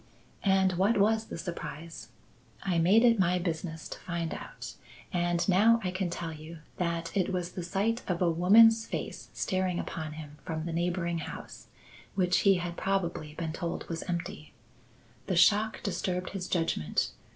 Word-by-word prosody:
And 190 -1 +3
what 205 +4 +3
was 220 +2 +3
the - - -7
surprise? 165 -1 -7 0.5
I 180 -3 +1
made 195 +8 +5
it 230 -3 +5
my 180 -1 +3
business 160 -2 -3
to - - -7
find 170 -2 -3
out, - - -8 0.4
and 175 -1 +1
now 215 +5 +5
I 185 - -1
can 185 -1 -1
tell 170 -1 -4
you 155 +2 -9 0.2
that 170 -1 -2
it 190 -1 +1
was 180 -1 -2
the 180 - -5
sight 205 +7 0
of 180 -2 -1
a 175 -2 +3
woman's 225 +7 +6
face - - -5
staring 185 -1 0
upon 155 -3 -4
him 150 -1 -9
from 160 -1 -4
the 170 - -3
neighbouring 170 0 -1
house 155 - -8 0.5
which 180 -2 +3
he 195 -1 +5
had 175 -1 -4
probably 170 -6 -1
been 160 -2 -3
told 170 0 -4
was 165 -1 -3
empty. 175 +3 -4 0.7
The 185 - 0
shock 210 +5 +4
disturbed 185 -2 -2
his 190 -2 -4
judgment. 165 - 0
180 Hz, 165 wpm, -30 LUFS, 170-195 Hz, 0.7 s, woman's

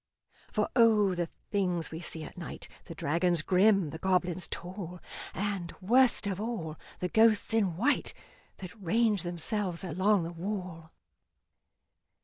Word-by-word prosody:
For - - +1
O! 215 -5 +5
the 175 -2 -2 0.2
things 180 -5 0
we 160 - -5
see 165 -2 -4
at - - -9
night - - -6 0.2
The - - -8
dragons 170 +2 +1
grim, 190 -3 +4
the 160 - -7
goblins 180 -1 0
tall, 180 0 -6 0.3
And, 195 -4 -3
worst 240 +4 +4
of 200 -1 -2
all, 185 -9 -4 0.2
the 180 - -1
ghosts 220 0 +4
in 195 -7 +2
white 260 +9 +2 0.5
That 185 -2 -8
range 210 +2 +2
themselves 175 +2 -3
along 190 +3 +2
the 165 - -4
wall! 175 -2 -5
185 Hz, 135 wpm, -30 LUFS, 170-210 Hz, 0.5 s, O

